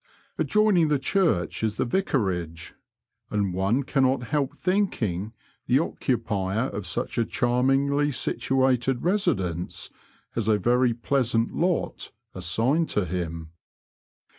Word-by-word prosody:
Adjoining 210 -6 +3
the 150 -1 +2
church 135 - +1
is 110 -1 0
the - - 0
Vicarage, 95 - -1 0.6
and 100 -3 0
one 100 +9 +1
cannot 130 -1 +1
help 145 -2 -1
thinking 115 - 0 0.4
the 125 - +4
occupier 115 - -1
of 100 -2 -5
such 120 0 -2
a - - +4
charmingly 135 +5 +1
situated 130 0 +1
residence 125 - -1 0.4
has 115 -2 -2
a 110 -1 +4
very 120 +4 +3
pleasant 120 -2 0
lot 175 0 -1 0.2
assigned 115 - 0
to 105 - 0
him. 85 -2 -4
120 Hz, 115 wpm, -25 LUFS, 100-140 Hz, 0.6 s, the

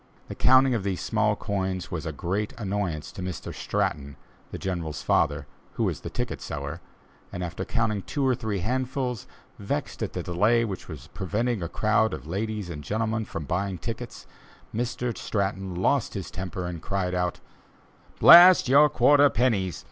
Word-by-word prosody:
The - - -4
counting 130 +1 +5
of 115 - 0
these 95 -2 -2
small 105 -1 +1
coins 95 -3 -3
was 80 -1 -4
a - - -2
great 95 +8 -3
annoyance 95 -7 -3
to - - -8
Mr. 90 -1 -5
Stratton, 70 -2 -2 0.3
the - - -6
General's 85 -5 -4
father, - - +1 0.3
who - - -1
was - - -1
ticket - - -4
seller, 75 +4 -5 0.5
and 90 - -5
after 85 0 -4
counting 110 -3 0
two 140 +7 -2
or 130 - +3
three 110 -5 -3
handsful, 125 +1 -2 0.4
vexed - - -4
at - - -3
the - - -3
delay 110 +7 +2
which 95 -5 -6
was 75 -4 -9
preventing 105 +3 -1
a 85 - -3
crowd 110 +1 +1
of - - -11
ladies 105 +3 -3
and 75 -4 -7
gentlemen 110 +4 -1
from 85 -5 -6
buying 95 +4 -2
tickets, 115 +5 -7 0.5
Mr. 120 +1 -2
Stratton 95 -2 -2
lost 90 - +1
his - - -5
temper 90 0 -5
and 85 -2 -5
cried 95 -2 -2
out: 90 -1 -1 0.8
"Blast 175 -2 +9
your 145 +3 +6
quarter 145 +3 +5
pennies! 105 - 0
100 Hz, 165 wpm, -26 LUFS, 90-115 Hz, 0.8 s, Blast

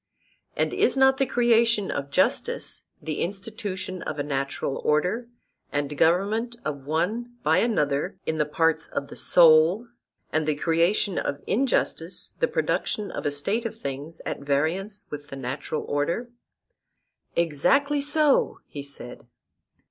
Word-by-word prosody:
And - - 0
is - - +2
not 265 0 +5
the 270 -1 +1
creation 235 -4 +3
of 140 0 -3
justice - - 0
the 155 -2 -4
institution 195 -1 -4
of 155 - -4
a 145 - -1
natural 140 -1 -2
order 180 +11 +1 0.4
and 145 0 -2
government 205 +10 +2
of 140 -3 -4
one 215 +10 -1
by 160 +4 +4
another 150 -12 0
in 160 0 -1
the 150 - +2
parts 160 +1 +1
of 140 - -4
the - - -9
soul, 170 +7 +5 0.4
and 155 0 +1
the 155 - +2
creation 170 +5 +2
of 140 - -3
injustice 200 -8 -1
the - - +3
production 210 - -1
of - - -3
a - - +1
state 195 +11 -1
of 225 -1 -5
things 145 0 -6
at - - -3
variance 160 +9 -1
with 145 0 -6
the 135 - -8
natural 135 +3 -4
order? 170 +12 -1 1.0
Exactly 275 - +2
so, 295 0 +3
he 145 - -7
said. 140 -3 -8
165 Hz, 140 wpm, -25 LUFS, 145-225 Hz, 1.0 s, not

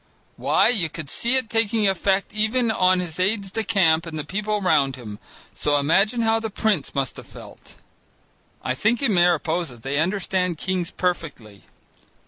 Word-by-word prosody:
Why, - - +2
you 200 -10 +1
could 155 -2 -8
see 240 +3 0
it 260 -3 +1
taking 225 -1 +1
effect 195 +1 0
even 220 +2 +1
on 185 -3 +3
his 175 -1 -6
aides 195 +1 0
de 225 +2 -2
camp 170 -7 +2
and 160 -1 -6
the 150 - -3
people 210 +6 -2
round 145 -8 +2
him, 110 -5 -9 0.3
so 145 0 +1
imagine 195 +11 +2
how 225 0 +2
the 220 0 -4
prince 205 -9 -1
must 135 -4 -2
have - - -11
felt! - - -14 0.9
I 130 - -1
think 225 - 0
in 235 -6 +2
Mariposa 170 -5 +1
they 135 +5 -3
understand 180 0 -1
kings 180 0 -2
perfectly. 145 - -4
185 Hz, 165 wpm, -23 LUFS, 155-215 Hz, 0.9 s, on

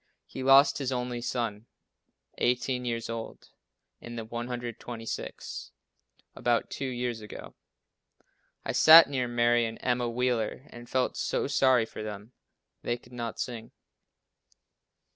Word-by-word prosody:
He 130 - -8
lost 135 +2 +6
his 135 -2 -2
only 125 -1 -2
son, 115 -3 -3 0.7
18 125 0 0
years 115 -1 -2
old 115 -1 -7 0.5
(in 120 0 -9
the 115 -1 -5
126th), 120 0 -6 0.7
about 120 -1 0
two 135 - -3
years 120 -2 -3
ago. 105 - -10 1.1
I - - -1
sat 160 +1 +9
near 130 -3 0
Mary 120 0 +3
and 110 - -7
Emma 125 -1 0
Wheeler 120 0 -1
and 120 0 -11
felt 130 -1 0
so - - -1
sorry 130 -4 +3
for 110 - -9
them. 105 +1 -7 0.5
They 120 - -1
could 120 +1 -19
not 120 -2 -5
sing. 115 -2 -5
120 Hz, 125 wpm, -28 LUFS, 115-125 Hz, 1.1 s, sat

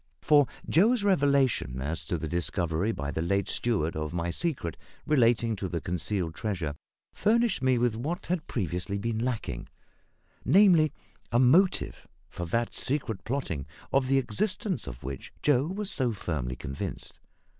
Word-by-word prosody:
For 145 -3 +5 0.2
Joe's 215 +7 +4
revelation 140 - +2
as 75 +5 -3
to 85 - -1
the 80 - -4
discovery 85 +3 0
by 70 -8 -4
the 80 - -2
late 100 +4 0
steward 100 -9 0
of 75 +1 -3
my 85 0 -1
secret 125 - -2 0.3
relating 120 -5 +3
to 95 - -3
the 85 - -2
concealed 85 +1 -2
treasure 90 -7 -3 0.4
furnished 230 - +2
me 130 -1 +3
with 120 -2 +1
what 155 +10 -3
had 175 -3 -2
previously 90 - -2
been 110 +2 -2
lacking, 115 - -3 0.8
namely, 175 -6 +5 0.4
a 120 - +3
motive 155 +10 +3 0.2
for 85 - -6
that 115 +6 -1
secret 125 -7 0
plotting 115 - -3 0.3
of 135 -1 +3
the 135 +1 +3
existence 180 - -1
of - - -8
which 65 +1 -6
Joe 145 -1 +3
was 195 +3 -2
so 125 -4 +1
firmly 70 - -3
convinced. 70 +1 -6
115 Hz, 150 wpm, -28 LUFS, -, 0.8 s, For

